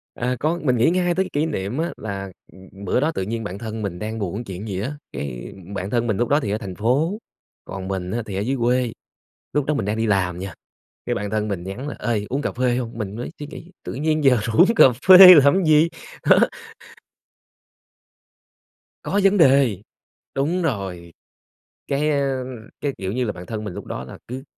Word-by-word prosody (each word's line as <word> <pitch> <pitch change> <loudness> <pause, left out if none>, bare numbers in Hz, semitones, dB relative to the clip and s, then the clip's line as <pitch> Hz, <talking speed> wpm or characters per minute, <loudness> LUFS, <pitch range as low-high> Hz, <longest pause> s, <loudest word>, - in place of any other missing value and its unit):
À, 125 +1 -1
có, 165 +3 0
mình 125 -4 +2
nghĩ 120 - +4
ngay 175 -1 +1
tới 190 - +2
cái - - -8
kỷ 150 +2 +1
niệm 115 -5 -3
á 165 +2 -1
là, 100 -3 -5 0.2
ừ, - - -16 0.3
bữa 110 - +1
đó 155 +4 +1
tự 95 - -4
nhiên 115 +3 -4
bạn 100 -1 -5
thân 110 -1 -5
mình 90 -4 -4
đang 110 +1 -4
buồn 100 +4 -3
chuyện 100 +1 -7
gì 95 -2 -3
á, 135 +7 -3 0.2
cái 60 -4 -6 0.2
bạn 95 +1 -3
thân 120 0 0
mình 110 - 0
lúc 120 - +1
đó 145 +2 +4
thì 105 -7 -3
ở 105 - 0
thành 95 -4 -7
phố, 140 - +1 0.5
còn 95 -1 -6
mình 95 -2 -3
á 120 +1 -1
thì 100 - -6
ở - - -1
dưới 130 +7 -1
quê, 120 0 +1 0.6
lúc 150 -2 +1
đó 150 - 0
mình 140 - -1
đang 105 +2 -1
đi 110 0 0
làm 90 -4 0
nha, 95 -2 -6 0.5
cái - - -1
bạn 105 0 -3
thân 110 0 -1
mình 95 -4 -3
nhắn 110 +10 -6
là - - -5
"Ê, 105 -2 -1
uống 135 +3 -1
cà - - -2
phê 125 0 0
hông?" 115 -2 -5
Mình 105 -2 -4
mới 120 - -5
suy 145 - -6
nghĩ: 170 +3 -11
"Tự - - -6
nhiên 155 +2 0
giờ 130 -3 +5
rủ 115 +1 -3
uống 225 +6 +6
cà - - +8 0.2
phê 185 -1 +12
làm 145 +6 +5
gì?" 155 +2 +5 0.4
Đó. - - +7 2.6
Có 200 - 0
vấn 195 +1 +4
đề. 135 - +4 0.5
Đúng 160 +7 0
rồi, 95 - -3 0.8
cái, 145 +2 0
ơ, 135 -3 0 0.4
cái, 145 - 0
kiểu, 95 0 -4
như 125 +1 -1
là 105 - -1
bạn 90 -1 -10
thân 110 -2 -5
mình 105 -4 -5
lúc 100 - -8
đó - - -5
là - - -10
cứ 130 +2 -6
120 Hz, 220 wpm, -22 LUFS, 100-145 Hz, 2.6 s, phê